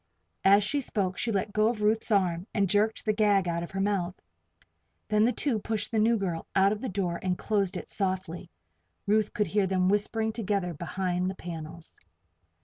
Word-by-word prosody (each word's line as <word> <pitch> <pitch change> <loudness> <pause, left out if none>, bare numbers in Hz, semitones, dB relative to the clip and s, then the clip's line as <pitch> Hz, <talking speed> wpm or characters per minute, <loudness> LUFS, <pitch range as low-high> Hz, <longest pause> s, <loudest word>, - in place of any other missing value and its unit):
As 200 +1 +6
she 280 +8 0
spoke 195 -8 -1
she 235 - 0
let 200 0 -1
go 215 0 +3
of 225 -2 -1
Ruth's 220 +3 +1
arm 185 -3 +1
and 200 -2 +2
jerked 210 +3 +1
the 215 - +2
gag 205 -3 +3
out 170 0 -1
of 170 - -6
her 195 - -5
mouth. 195 -3 -1 0.9
Then 210 0 +4
the 245 - +3
two 250 -4 0
pushed 215 0 -3
the 225 - +1
new 230 +2 +3
girl 180 -5 -3
out 195 +1 +5
of 210 0 -3
the 260 - -3
door 180 -3 -2
and 185 -1 -1
closed 200 -3 0
it - - -7
softly. 185 -3 -3 0.6
Ruth 210 0 +2
could 210 - 0
hear 205 -2 +1
them 185 -1 +1
whispering 220 +2 +1
together 200 -5 -1
behind 180 +3 -2
the 190 - -5
panels. 165 -2 -8
200 Hz, 195 wpm, -28 LUFS, 185-215 Hz, 0.9 s, As